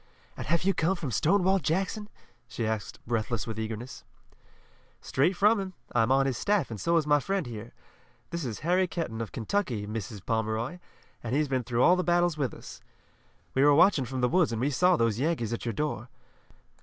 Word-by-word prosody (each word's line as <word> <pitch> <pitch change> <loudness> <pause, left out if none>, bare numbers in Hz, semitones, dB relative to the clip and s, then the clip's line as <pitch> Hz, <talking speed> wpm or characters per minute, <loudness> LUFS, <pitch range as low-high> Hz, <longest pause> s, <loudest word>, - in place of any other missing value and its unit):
"And - - -6
have 170 +2 +1
you 195 +1 +3
come 175 +3 +1
from 150 -7 -4
Stonewall 190 - +3
Jackson?" 190 +7 -1 0.4
she 120 -2 -3
asked 110 -1 -3
breathless 115 -1 -1
with 110 -1 -5
eagerness. 110 +3 -5 1.0
"Straight 150 +8 +1
from 210 +3 +4
him. 190 -1 -5 0.2
I'm 115 +1 +3
on 135 +1 +4
his 130 -3 -1
staff 200 - +1
and 110 - -6
so 170 0 +2
is 160 - +1
my 145 0 +4
friend 195 +3 -1
here. 115 -1 -8 0.6
This 170 -1 -3
is 120 -5 -5
Harry 180 +3 +2
Kenton 160 -11 -4
of 115 - -5
Kentucky, 120 - -2
Mrs. 105 -2 -6
Pomeroy, 110 +8 -1 0.4
and 120 +2 -2
he's 150 +1 +2
been 130 -2 -1
through 120 +1 +1
all 180 - +6
the 180 - 0
battles 175 -1 +2
with 140 -6 -1
us. - - -11 0.7
We 135 - +3
were 145 0 +6
watching 160 -4 +5
from 130 +1 -4
the 125 - +4
woods 175 -2 +2
and 115 - -2
we 135 +5 +1
saw 180 +6 +4
those 115 -3 +1
Yankees 135 -7 0
at 115 - -4
your 115 - -1
door. 125 -2 -3
135 Hz, 200 wpm, -28 LUFS, 115-175 Hz, 1.0 s, all